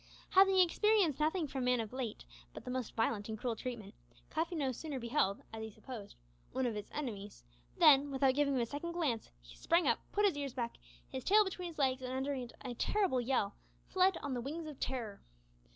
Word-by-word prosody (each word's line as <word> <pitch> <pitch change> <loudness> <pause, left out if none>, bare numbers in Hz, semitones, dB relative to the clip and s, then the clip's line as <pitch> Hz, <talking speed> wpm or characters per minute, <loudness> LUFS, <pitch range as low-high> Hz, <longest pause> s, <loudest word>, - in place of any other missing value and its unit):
Having 385 0 +6
experienced 370 -3 +4
nothing 315 +3 +1
from 265 -2 -3
man 250 -1 +3
of 225 0 -4
late 250 - -4 0.3
but - - -8
the 250 - -4
most 255 -3 -3
violent 225 -2 0
and 220 - -3
cruel 235 +1 -2
treatment, 225 -4 -6 0.4
Cuffy 330 +2 -1
no 280 -5 0
sooner 275 +2 -5
beheld, 235 -5 0
as 220 - -5
he 220 - -5
supposed, 220 -1 -9 0.4
one 260 0 0
of 240 - 0
his 210 -1 -6
enemies, 210 -8 -5 0.3
than, 285 0 +7
without 270 -1 +3
giving 280 0 +2
him 250 - +2
a - - +1
second 295 +7 -5
glance, 295 -10 -1
he - - -14
sprang 340 +1 +2
up, - - +3
put 415 +1 +3
his 385 -6 +3
ears 280 -3 -4
back, 235 -2 -3 0.3
his 260 -1 -5
tail 425 +2 +6
between 365 -2 -4
his 335 - -9
legs, 265 -2 +2
and, 255 0 -4
uttering 265 -2 -2
a 255 -3 -5
terrible 365 - +1
yell, 240 -5 +1 0.3
fled 375 0 +3
"on 280 - -2
the 245 - -2
wings 310 +6 -4
of 300 -3 -8
terror!" 235 -6 -3
265 Hz, 210 wpm, -35 LUFS, 235-315 Hz, 0.4 s, than